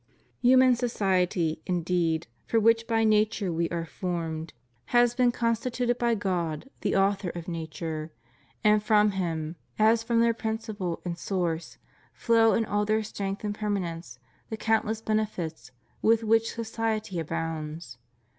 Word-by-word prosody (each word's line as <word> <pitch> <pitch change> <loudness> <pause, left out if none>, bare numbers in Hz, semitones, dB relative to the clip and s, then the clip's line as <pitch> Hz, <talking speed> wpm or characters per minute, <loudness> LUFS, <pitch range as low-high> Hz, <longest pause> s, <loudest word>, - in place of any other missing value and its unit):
Human 255 0 +6
society, 185 -8 0
indeed, 170 -2 0 0.2
for 230 - +2
which 230 +1 +3
by 225 -1 +2
nature 215 -3 +2
we 165 +1 0
are 170 -1 -3
formed, 165 -2 -4 0.3
has 240 -1 +3
been 245 0 +3
constituted 235 +1 0
»8 - - -26
FREEMASONRY. 235 -1 +2
by - - -5
God 175 - -2
the - - 0
Author 195 -1 +2
of 170 - -7
nature; 160 -1 -5 0.5
and 210 0 +5
from 210 0 +4
Him, 165 -4 -3 0.2
as 220 +1 +4
from 230 0 +1
their 230 0 +4
principle 220 -6 -4
and 175 -1 -4
source, 175 -4 -2 0.4
flow 225 -1 +4
in 225 - +1
all 205 0 0
their 215 +1 +1
strength 200 -1 -4
and 210 -1 -1
permanence 180 - -3 0.3
the 220 - -4
countless 220 0 0
benefits 190 - -2 0.3
with 225 +1 +3
which 225 +1 +2
society 220 -4 -2
abounds. 160 -4 -4
205 Hz, 145 wpm, -27 LUFS, 170-225 Hz, 0.5 s, Human